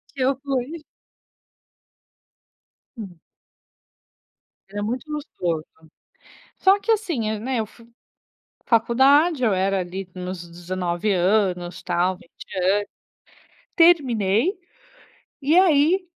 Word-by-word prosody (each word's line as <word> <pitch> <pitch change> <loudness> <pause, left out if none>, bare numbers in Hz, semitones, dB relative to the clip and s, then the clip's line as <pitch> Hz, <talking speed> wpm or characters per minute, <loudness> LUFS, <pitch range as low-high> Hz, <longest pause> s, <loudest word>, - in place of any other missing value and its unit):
Que 265 - -5
eu 270 +1 +2
fui. 280 +4 -3 2.1
Hum. 185 -6 -9 1.5
Era 205 +1 -4
muito 250 +8 -4
gostoso. 175 - -3 0.9
Só 390 +1 +4
que 455 - -1
assim, 335 - 0
hã, 215 -1 -3
né, 250 +1 -2
eu 220 - -1
fui 230 +2 -19 0.8
faculdade, 265 +6 +3
eu 215 -4 +3
era, 190 +1 +1
ali, 185 +1 -5
nos 180 -1 -6
19 175 +3 -3
anos, 185 -1 0
tal, 180 +1 0
20 170 - -15 1.1
anos. - - -32
Terminei, 290 - +3 0.8
e 305 +6 +3
aí 355 +1 +4
220 Hz, 100 wpm, -23 LUFS, 185-290 Hz, 2.1 s, Só